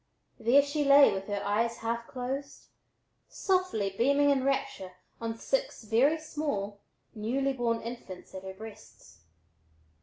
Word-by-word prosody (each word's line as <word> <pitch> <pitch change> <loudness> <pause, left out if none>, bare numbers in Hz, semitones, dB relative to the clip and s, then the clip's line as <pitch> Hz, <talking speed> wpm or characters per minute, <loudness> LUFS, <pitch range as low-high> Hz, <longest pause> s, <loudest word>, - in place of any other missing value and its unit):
There 250 +5 +5
she 290 +1 -1
lay 280 -2 +7
with 195 0 -4
her 205 -1 -2
eyes 230 +3 +1
half 230 +1 -3
closed, 270 +3 -5 0.6
softly 365 - 0
beaming 280 +5 +4
in 270 -2 +2
rapture 260 -8 -1 0.3
on 225 0 -3
six - - -2
very 245 +9 +3
small, 285 -11 -3 0.3
newly 260 +6 -1
born 235 -3 0
infants 230 -6 -8
at 190 - -6
her 190 0 -8
breasts. 110 - -13
235 Hz, 130 wpm, -30 LUFS, 205-280 Hz, 0.6 s, lay